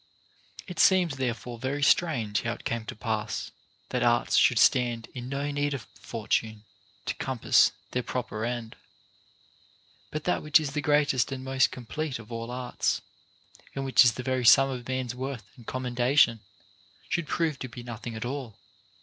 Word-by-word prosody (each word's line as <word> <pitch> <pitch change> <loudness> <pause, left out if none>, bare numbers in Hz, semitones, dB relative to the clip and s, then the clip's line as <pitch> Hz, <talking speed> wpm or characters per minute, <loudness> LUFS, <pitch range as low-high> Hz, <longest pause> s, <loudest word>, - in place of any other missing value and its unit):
5. - - -25
It 180 - -7
seems 180 -7 +4
therefore 120 -2 -3
very 135 +3 -2
strange 120 -10 +2
how 115 - -2
it - - -12
came 115 -1 -2
to - - -6
pass 110 -1 -3 0.4
that - - -1
arts 120 0 +2
should 125 - +5
stand 120 0 +3
in 125 -1 -6
no 140 +1 -2
need 145 0 0
of 125 - -7
Fortune 110 -1 -2 0.4
to - - -1
compass 130 -3 +3 0.2
their 125 - 0
proper 115 -3 -4
end, 120 -1 -4 1.3
but 155 0 -4
that 180 - 0
which 150 +1 +5
is 150 -3 -3
the 150 +1 -2
greatest 145 -4 +2
and 130 -1 -5
most 135 0 +2
complete 135 +4 -4
of 115 0 -13
all 115 0 -5
arts, 125 0 -2 0.7
and 135 0 -3
which 135 0 +6
is 120 -2 +4
the 125 - -6
very 130 -1 0
sum 135 +3 +7
of 125 -2 -6
man's 130 -2 -2
worth 130 -2 -5
and 120 -4 -16
commendation, 125 -1 +2 0.7
should 170 -3 -1
prove 160 -5 0
to 130 - -5
be 120 +1 -9
nothing 120 -1 -7
at 110 - -4
all. 125 -5 -5
125 Hz, 175 wpm, -28 LUFS, 115-140 Hz, 1.3 s, sum